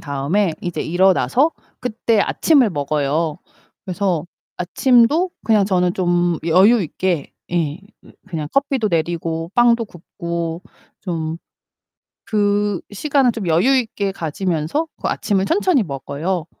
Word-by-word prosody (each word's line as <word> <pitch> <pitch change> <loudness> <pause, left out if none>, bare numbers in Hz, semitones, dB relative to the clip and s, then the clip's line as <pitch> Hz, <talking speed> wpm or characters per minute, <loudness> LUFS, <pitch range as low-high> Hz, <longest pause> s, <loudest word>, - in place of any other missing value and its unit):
다음에 155 +6 0
이제 175 -1 -4
일어나서 190 - +3 0.3
그때 230 -2 0
아침을 280 -2 +3
먹어요. 150 +1 -1 0.5
그래서 180 -3 -1 0.3
아침도 250 - +3
그냥 215 -3 +4
저는 180 -2 +1
좀 175 -2 +1
여유 195 +7 +5
있게 175 -2 -2 0.2
예 160 -3 -1 0.2
그 - - -17 0.2
그냥 160 -5 -4
커피도 275 -5 +1
내리고 165 -1 -2
빵도 240 -1 +4
굽고 170 -1 -5 0.4
좀 165 -3 -3 0.9
그 205 -2 +1
시간을 270 +3 +2
좀 215 -4 -5
여유 180 +12 +3
있게 215 -5 -2
가지면서 175 - -2
그 - - -2
아침을 195 -2 0
천천히 340 - +2
먹어요. 155 +4 -3
185 Hz, 255 characters per minute, -19 LUFS, 165-225 Hz, 0.9 s, 여유